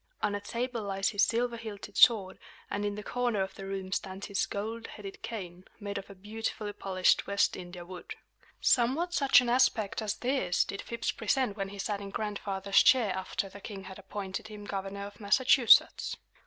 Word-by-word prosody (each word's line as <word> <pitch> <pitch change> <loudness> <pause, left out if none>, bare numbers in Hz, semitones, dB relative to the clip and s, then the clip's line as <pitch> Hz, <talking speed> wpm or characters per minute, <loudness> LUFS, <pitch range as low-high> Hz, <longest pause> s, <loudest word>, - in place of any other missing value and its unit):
On 205 - +1
a 205 - -3
table 235 +2 -3
lies 195 -1 -1
his 205 - 0
silver 235 +3 +1
hilted 215 -3 -8
sword; 205 -6 +5 0.3
and 205 - -1
in 205 0 -1
the 210 - -6
corner 245 -3 -1
of 190 0 -1
the 195 0 -8
room 190 -1 -4
stands 190 0 -3
his 200 - -1
gold 225 +3 -4
headed 200 -2 -9
cane, 185 -5 -6 0.2
made 200 -1 -4
of 195 - -12
a 200 - -10
beautifully 210 +1 -4
polished 185 -2 +2
West 200 0 +2
India 175 -1 -8
wood 180 0 -8 0.4
Somewhat 275 +9 +2
such 275 -5 +6
an 250 - -3
aspect 240 -5 +2
as 215 -1 -1
this 250 -9 +1
did 195 - -6
Phips 235 - -2
present 230 -1 0
when 195 -2 -3
he 200 - -9
sat 200 0 -2
in 200 - -6
Grandfather's 200 -1 +1
chair 230 -7 +4
after 190 +1 -3
the 200 +1 -12
king 195 -2 -7
had 190 +1 -10
appointed 195 0 -5
him 210 -1 -9
Governor 195 0 -4
of 205 0 -11
Massachusetts. 240 +3 +5
205 Hz, 190 wpm, -30 LUFS, 195-225 Hz, 0.4 s, such